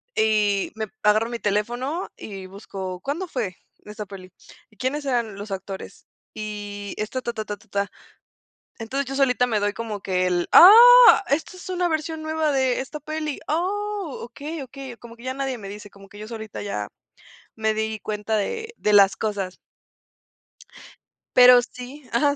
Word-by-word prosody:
y 210 -2 +2
me 220 -1 -3 0.2
agarro 215 +2 +3
mi 235 -1 -4
teléfono 240 - -2
y 195 -3 -8
busco, 190 -2 -7
¿cuándo 330 +7 -3
fue 220 - -3 0.3
esa 210 0 -7
peli? 185 -2 -11 0.4
¿Y 215 - -25
quiénes 280 +4 -2
eran 235 -6 -1
los 205 0 -8
actores 195 0 -7 0.3
y 205 -1 -6
esta 235 +5 -3
ta, 235 -1 -4
ta, 215 -1 -5
ta, 205 -1 -5
ta, 220 +2 -23
ta. 200 +1 -2 0.9
Entonces, 265 +5 -3
yo 270 +1 -5
solita 250 -2 +3
me 215 -2 +1
doy 205 0 0
como 220 -3 -5
que 185 -1 0
el: 175 -1 0
"Ah, 470 +4 +10
esta 315 +6 -1
es 365 - -10
una 360 -1 0
versión 315 0 -3
nueva 315 -1 0
de 260 -2 +1
esta 300 +3 -7
peli, 305 0 -4
oh, 395 +1 -2
okey, 290 +5 -7
okey", 260 -1 -9
como 235 0 -13
que 235 - -15
ya 260 0 -3
nadie 270 -3 -3
me 200 -2 -8
dice 205 0 -9
como 195 0 -16
que 205 - -14
yo 215 +1 -8
solita 220 -3 -7
ya 105 - -3 0.7
me 220 0 0
di 220 0 -2
cuenta 215 +1 -2
de 450 - -3
de 210 - +1
las 195 -2 +6
cosas. 200 -4 -3 1.8
Pero 250 0 +9
sí 250 +4 -10
ajá. 285 +5 +2
230 Hz, 170 wpm, -23 LUFS, 205-285 Hz, 1.8 s, Ah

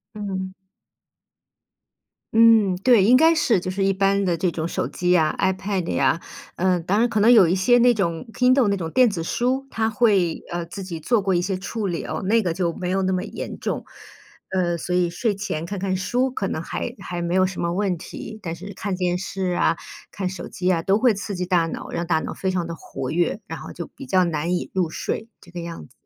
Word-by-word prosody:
嗯。 190 -2 -4 1.8
嗯， 220 -4 +5
对， 220 0 +5
应 245 +5 +6
该 325 +2 +5
是， 235 -9 +3
就 185 - -5
是 190 +1 -1
一 195 - +3
般 195 +1 +2
的 175 -3 +1
这 180 +2 +1
种 160 -1 -3
手 170 - -2
机 180 0 -1
呀 160 -4 +3
，iPad 190 0 0
呀， 165 - +2 0.3
嗯， 180 -1 +1
当 195 +5 +1
然 240 - +3
可 215 - 0
能 215 +3 +5
有 215 -6 +8
一 170 - +2
些 220 +6 +4
那 245 0 +5
种 170 -3 -2
Kindle 255 -2 +4
那 200 - +1
种 165 -3 -4
电 250 +7 +4
子 190 -5 -4
书， 255 +10 -1
它 220 -2 0
会， 205 -7 +2
呃， 175 0 -3
自 185 +4 -8
己 175 -4 -6
做 235 +5 +2
过 190 -2 +1
一 175 - +2
些 190 +1 -2
处 205 +2 -4
理 175 -3 -3
哦， - - -4
那 225 +4 +3
个 180 -5 -1
就 175 -1 0
没 180 +2 -4
有 190 +1 +1
那 190 0 +1
么 185 -1 0
严 - - -7
重。 - - -3 0.7
呃， 175 -2 +1
所 180 +2 -2
以 180 -1 +2
睡 205 +4 -1
前 165 -5 -4
看 200 +4 -5
看 190 0 -1
书 250 +7 0
可 200 -6 -2
能 160 - -3
还 240 +7 -4
还 175 -1 -5
没 170 +1 -1
有 185 0 +4
什 185 -1 -5
么 170 0 0
问 190 -1 0
题。 215 +6 -8
但 165 -3 -4
是 195 +4 -9
看 195 -1 -3
电 180 -1 0
视 190 0 -3
啊， - - +3 0.3
看 190 -3 -3
手 190 - -7
机 185 0 -1
啊， 170 -2 +1
都 195 +4 +2
会 240 0 +4
刺 200 0 -5
激 180 0 -2
大 175 -2 +2
脑， - - -6
让 170 0 -3
大 160 -2 +2
脑 - - -5
非 190 - -2
常 185 -2 -1
地 170 - -5
活 130 -5 -6
跃， 175 +5 0
然 - - -6
后 - - -9
就 - - -6
比 275 - -11
较 185 -6 +3
难 170 0 -1
以 - - -4
入 180 -3 +1
睡， 220 +6 -4
这 175 - -16
个 175 - -6
样 170 - -7
子。 - - -26
190 Hz, 270 characters per minute, -23 LUFS, 175-210 Hz, 1.8 s, 有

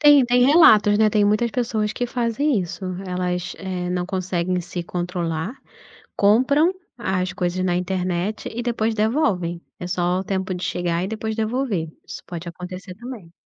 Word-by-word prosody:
Tem 290 -3 +7
tem 245 +1 +4
relatos, 215 -9 +6
né, 220 - +5
tem 210 -1 +3
muitas 215 +3 +2
pessoas 220 -3 -1
que 245 - -2
fazem 240 +1 +1
isso, 180 +1 -6 0.2
elas, 180 -1 -2
eh, 185 -2 -3
não 180 0 -1
conseguem 185 -1 -1
se 175 0 -5
controlar, 175 +2 -3 0.6
compram 260 - +4 0.3
as 185 -4 -1
coisas 180 +1 -1
na 175 -1 +1
internet 185 +2 -2
e 240 - -2
depois 230 -2 0
devolvem, 205 - 0 0.2
é 180 - -5
só 180 +1 0
o - - -5
tempo 190 -1 -2
de 180 - -4
chegar 175 0 -1
e - - -3
depois 220 0 -3
devolver, 220 -6 -1 0.2
isso - - -8
pode 175 -1 -6
acontecer 180 +2 -8
também. 220 -5 -9
190 Hz, 165 wpm, -22 LUFS, 180-225 Hz, 0.6 s, Tem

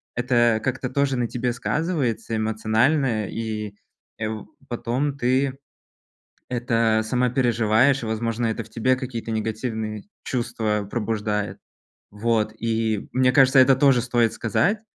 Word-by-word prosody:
это 120 -2 +2
как-то 130 +1 -2
тоже 140 0 +1
на 120 -1 0
тебе 125 +1 -2
сказывается 140 -5 -1
эмоционально, 110 +2 +1
и, 110 -2 -4 0.4
э, 110 - -1
в 110 -2 -6 0.2
потом 125 +4 -1
ты 130 +1 +1 0.9
это 115 -2 +1
сама 125 +3 +1
переживаешь. 120 +1 +2
Возможно, 115 +1 -2
это 110 +1 -2
в - - -18
тебе 130 +3 +1
какие-то 125 -3 -5
негативные 110 -1 -3 0.2
чувства 110 -4 -2
пробуждает, 105 -2 -2 0.5
вот. 110 +1 0
И 110 -2 -1
мне 130 0 +3
кажется, 135 0 +6
это 130 0 +6
тоже 135 -3 +4
стоит 120 -2 +1
сказать. 170 - 0
115 Hz, 125 wpm, -23 LUFS, 110-130 Hz, 0.9 s, кажется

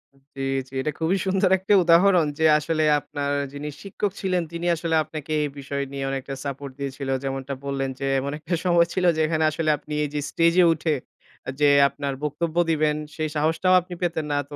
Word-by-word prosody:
উ - - -26 0.2
জি, 135 - -6 0.3
জি। - - -22
এটা 150 - -1
খুবই 170 +4 +1
সুন্দর 190 0 +2
একটা 190 +3 0
উদাহরণ 175 0 +5
যে 160 - +3
আসলে 155 0 -1 0.2
আপনার 145 -1 -4 0.2
যিনি 145 +1 -5
শিক্ষক 200 0 -3
ছিলেন 185 -2 0
তিনি 170 +1 -5
আসলে 165 0 -1
আপনাকে 155 0 -8
এই 145 - -1
বিষয় 140 0 -3
নিয়ে 135 -1 -4
অনেকটা 135 0 -4
সাপোর্ট 140 0 -5
দিয়েছিল। 135 0 -4
যেমনটা 135 0 -3
বললেন 135 -1 -2
যে 135 - -2
এমন 140 +2 -3
একটা 170 +3 -5
সময় 170 -1 +4
ছিল 185 -1 0
যে 160 - 0
এখানে 160 0 0
আসলে 155 0 -1
আপনি 150 - -9
এই 145 - -2
যে 150 - -1
স্টেজ 170 0 +3
এ - - +6
উঠে 155 -1 -1 0.6
যে, 145 -1 +5 0.2
আপনার 140 -1 -4
বক্তব্য 160 +2 -2 0.2
দিবেন 155 -1 +2 0.2
সেই 155 -1 -2
সাহসটাও 165 +5 +2
আপনি 180 +1 -10
পেতেন 165 -3 -1
না। 145 - +1
তো 145 - -8
155 Hz, 200 wpm, -24 LUFS, 140-170 Hz, 0.6 s, এ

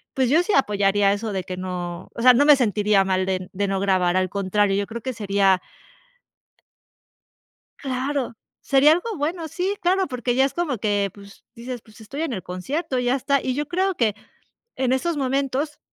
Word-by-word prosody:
pues, 260 -2 +2
yo 310 +6 +4
sí 415 - -1
apoyaría 205 -4 +3
eso 210 +1 -3
de 190 -1 -2
que 185 -1 -6
no 180 -1 -5
o - - -5
sea, 255 0 +8
no 280 +4 +4
me 295 -1 +8
sentiría 210 -4 +2
mal 185 0 0
de 185 -1 -2
de 200 +1 -1
no 195 0 -1
grabar, 185 -2 +2
al 185 0 +1
contrario, 200 +1 +1
yo 200 0 -1
creo 230 +1 -6
que 260 - -3
sería 195 -4 +2 2.2
Claro, 265 -1 -2 0.3
sería 280 +2 +5
algo 405 +7 -1
bueno, 320 +2 -3
sí, 370 +6 -2
claro, 375 +2 +2
porque 250 -2 -2
ya 265 +2 +4
es 275 - -6
como 320 -8 -1
que, 205 -1 0
pues, 200 -1 -15
dices, 240 0 -7
pues, 215 0 -18
estoy 275 +8 -6
en 325 -5 -2
el 190 -5 -4
concierto, 260 - -3
ya 250 +1 +1
está, 275 +1 +1
y 255 - -1
yo 295 +2 -3
creo 375 +2 0
que 220 -4 +1 0.6
en 255 -1 0
esos 320 +5 0
momentos 275 +2 -1
245 Hz, 190 wpm, -23 LUFS, 200-280 Hz, 2.2 s, sea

